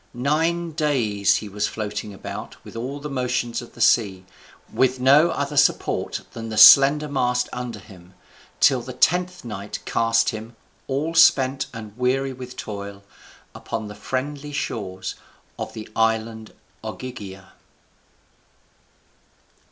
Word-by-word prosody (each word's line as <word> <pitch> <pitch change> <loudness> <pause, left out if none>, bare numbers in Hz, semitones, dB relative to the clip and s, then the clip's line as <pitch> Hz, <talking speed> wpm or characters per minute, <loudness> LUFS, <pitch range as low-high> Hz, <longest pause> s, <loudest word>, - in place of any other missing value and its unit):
Nine 165 +6 0
days 125 - +1
was 105 0 -2
he - - -7
floating 105 -1 -4
about 95 - -8
with - - -12
all 130 +5 -5
the 145 - -6
motions 125 -3 -2
of 120 - -13
the 120 - -9
sea, 95 -5 +3 0.5
with 130 0 +2
no 140 +6 +5
other 145 +1 -3
support 145 +1 +1
than 115 -1 -6
the 110 - -5
slender 140 +6 +8
mast 125 -3 0
under 125 -2 -5
him, 95 -3 -16 0.4
till 130 -3 +4
the 130 +2 -8
tenth 180 +4 +1
night 105 -2 -6
cast 115 0 +2
him, 110 +1 -7 0.3
all 145 +5 -2
spent 135 -5 +4
and 110 -3 -9
weary 130 +2 0
with 125 0 -10
toil, 100 -1 -7 0.5
upon 110 -2 -5
the - - -8
friendly 140 +6 -4
shores 100 -9 -4 0.5
of - - -5
the 110 - -8
island 110 0 0 0.3
Ogygia. 100 -7 -8
125 Hz, 130 wpm, -23 LUFS, 110-140 Hz, 0.5 s, slender